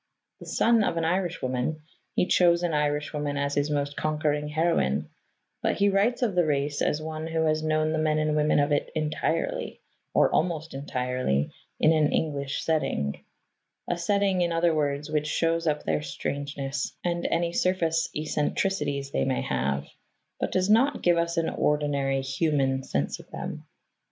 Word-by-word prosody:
The - - -11
son 230 -1 +3
of 170 - 0
an 165 - 0
Irishwoman, 155 -5 -1 0.3
he - - +3
chose 175 -1 +4
an 170 -2 0
Irishwoman 150 0 -1
as 140 0 -1
his 145 +1 +1
most 145 -1 -1
conquering 150 -1 0
heroine, 150 - 0 0.5
but - - +1
he 200 0 +3
writes 210 +6 +2
of 220 -5 +1
the 180 -1 +3
race 145 -1 0
as 150 - +1
one 155 0 -5
who 160 0 0
has 155 0 +1
known 155 0 +1
the 160 - 0
men 155 0 +2
and 155 0 +1
women 150 0 +3
of 145 +1 +2
it 145 - +1
entirely, 155 -1 -1 0.3
or - - +3
almost 165 -1 0
entirely, 125 - -1 0.3
in 155 - +5
an 155 -2 +3
English 140 -3 -1
setting 110 - -1 0.6
a 175 - 0
setting, 195 +1 +1
in 170 -1 +1
other 165 0 +2
words, 145 0 -1
which 150 -1 0
shows 165 +2 0
up 150 -1 0
their - - 0
strangeness 140 -1 -4
and 175 -1 -1
any 170 0 0
surface 165 -3 +1
eccentricities 150 -2 -1
they 65 - +1
may 65 - 0
have, 70 +2 -1 0.5
but - - -1
does 185 0 +1
not 240 +7 +3
give 175 -1 +4
us 170 +1 -1
an 165 -1 +2
ordinary 140 -2 0
human 135 -1 +1
sense 70 - -2
of - - -14
them. - - -6
155 Hz, 165 wpm, -27 LUFS, 145-170 Hz, 0.6 s, in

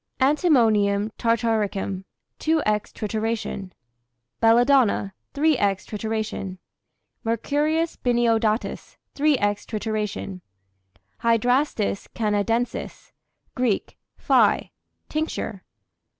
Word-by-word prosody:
Antimonium 225 - +3
tartaricum, 215 -5 0 0.3
2^{×} 320 0 +1 0.3
trituration. 215 -3 -3 0.7
Belladonna, 235 -3 +4 0.2
3^{×} 305 0 +3 0.3
trituration. 215 -3 -3 0.7
Mercurius 295 +8 0
biniodatus, 230 -3 0 0.2
3^{×} 295 0 +3 0.3
trituration. 210 -3 -3 0.8
Hydrastis 230 -2 +1
canadensis, 225 +2 -1 0.4
[Greek: 245 -6 -1 0.2
phi] - - +3 0.4
tincture. 305 - -3
225 Hz, 60 wpm, -24 LUFS, 210-260 Hz, 0.8 s, Belladonna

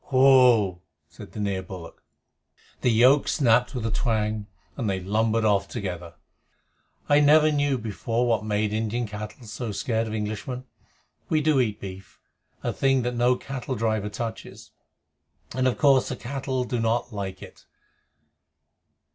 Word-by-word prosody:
Pull!" 125 -8 +5 0.3
said - - -13
the - - -7
near 100 -2 -1
bullock. 90 -3 -10 0.8
The - - +2
yoke 125 +5 +5
snapped 125 -2 +2
with 120 -3 -3
a 115 - -1
twang, 110 -2 -1 0.3
and 115 -6 -2
they 95 -1 -1
lumbered 110 +4 0
off 100 -2 +2
together. 90 -6 -6 0.9
I 145 0 +5
never 155 +1 +5
knew 145 -2 +1
before 115 +2 -2
what 115 -2 +1
made 105 0 -1
Indian 110 +2 -1
cattle 105 +3 -8
so 115 +1 -5
scared 115 +2 -1
of 110 - -4
Englishmen. 110 +4 -4 0.6
We 155 -1 +2
eat 130 -8 +1
beef 95 0 -10 0.4
a - - -1
thing 135 -2 +2
that 125 +1 -1
no 120 +1 +3
cattle 130 0 -5
driver 110 -2 -1
touches 115 +1 -7 0.8
and 130 +1 +1
of 125 - 0
course 135 -3 +4
the 130 - -3
cattle 130 +1 -3
do 125 -1 -3
not 115 +1 0
like 95 -2 -5
it. - - -14
115 Hz, 145 wpm, -25 LUFS, 105-130 Hz, 0.9 s, Pull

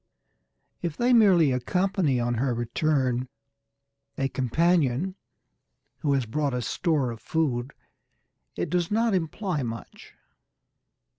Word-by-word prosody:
If 170 -3 -3
they 245 +1 +3
merely 185 - +5
accompany 170 +1 +1
on 120 0 0
her 120 +1 0
return 125 0 0 0.9
a 135 0 0
companion 150 +4 +1 0.9
who 145 -3 +1
has 135 -3 +1
brought 140 +3 -1
a 125 - -2
store 150 -7 0
of 115 -1 -9
food, 135 -6 -1 0.8
it - - -3
does 175 -2 +1
not 225 +1 +2
imply 180 -1 -1
much. 115 -2 -8
145 Hz, 115 wpm, -26 LUFS, 125-175 Hz, 0.9 s, merely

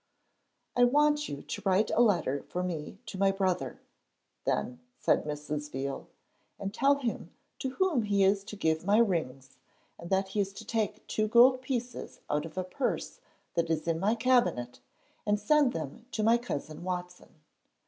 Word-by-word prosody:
'I 245 - +6
want 295 +3 +3
you 140 - -6
to - - -5
write 195 +1 +2
a 235 - +3
letter 170 - +2
for 180 - -2
me 170 0 -4
to 205 -4 -7
my 195 0 +4
brother,' 190 -2 -1 0.7
then 250 -1 -1 0.2
said - - +2
Mrs. 150 0 -4
Veal, 135 0 -4 0.5
'and 195 0 -4
tell 280 +5 +4
him 250 -5 -3 0.3
to 265 - -2
whom 365 -10 +2
he 200 -2 +2
is 195 +1 +3
to 210 - -7
give 160 -5 0
my 200 +3 +3
rings, 150 - 0 0.4
and 170 - -8
that 190 0 +1
he 210 - -2
is 195 -1 0
to - - -9
take 215 -2 -2
two 215 0 0
gold 250 +3 +6
pieces 250 -2 -4
out 150 +2 0
of 160 - -15
a 185 - 0
purse 185 +8 -3 0.3
that 170 -1 0
is 160 0 -1
in 165 -1 +1
my 210 +5 +2
cabinet, 235 - +2 0.4
and 210 0 +1
send 285 +4 +4
them 165 - -6
to 215 - 0
my 230 +2 +5
cousin 155 -9 -5
Watson.' 180 -1 -5
195 Hz, 175 wpm, -30 LUFS, 165-235 Hz, 0.7 s, I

